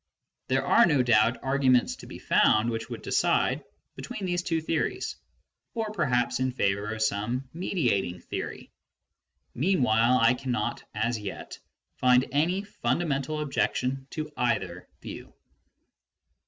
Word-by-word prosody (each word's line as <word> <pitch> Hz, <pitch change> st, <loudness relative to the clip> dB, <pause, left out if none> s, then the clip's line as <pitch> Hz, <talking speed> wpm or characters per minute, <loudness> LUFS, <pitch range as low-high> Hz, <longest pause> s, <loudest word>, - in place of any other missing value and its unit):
There -, -, +1 dB
are 235 Hz, -, +5 dB
no 145 Hz, -6 st, +3 dB
doubt 115 Hz, 0 st, +3 dB
arguments 130 Hz, -2 st, +2 dB
to -, -, -12 dB
be -, -, -9 dB
found 110 Hz, +2 st, +3 dB
which 115 Hz, +1 st, -4 dB
would 120 Hz, -, -7 dB
decide -, -, +1 dB, 0.3 s
between 195 Hz, -, -6 dB
these 175 Hz, -1 st, 0 dB
two 165 Hz, -2 st, -1 dB
theories, 160 Hz, +1 st, -2 dB, 0.6 s
or 220 Hz, -2 st, -2 dB
perhaps 125 Hz, -, 0 dB
in 130 Hz, 0 st, 0 dB
favour 100 Hz, -3 st, 0 dB
of 110 Hz, -, -1 dB
some 120 Hz, +6 st, -1 dB
mediating 120 Hz, -, -1 dB
theory. -, -, -6 dB, 0.8 s
Mean 170 Hz, +2 st, +1 dB
while, 115 Hz, +2 st, +4 dB
I 115 Hz, 0 st, +5 dB
cannot 125 Hz, -4 st, -3 dB
as 115 Hz, +1 st, 0 dB
yet 100 Hz, -2 st, -7 dB, 0.4 s
find 125 Hz, 0 st, +4 dB
any 175 Hz, +7 st, +1 dB
fundamental 150 Hz, -2 st, -1 dB
objection 135 Hz, -2 st, -1 dB
to 155 Hz, -1 st, -5 dB
either 90 Hz, -7 st, -1 dB, 0.2 s
view. -, -, -9 dB
125 Hz, 130 wpm, -27 LUFS, 115-155 Hz, 0.8 s, are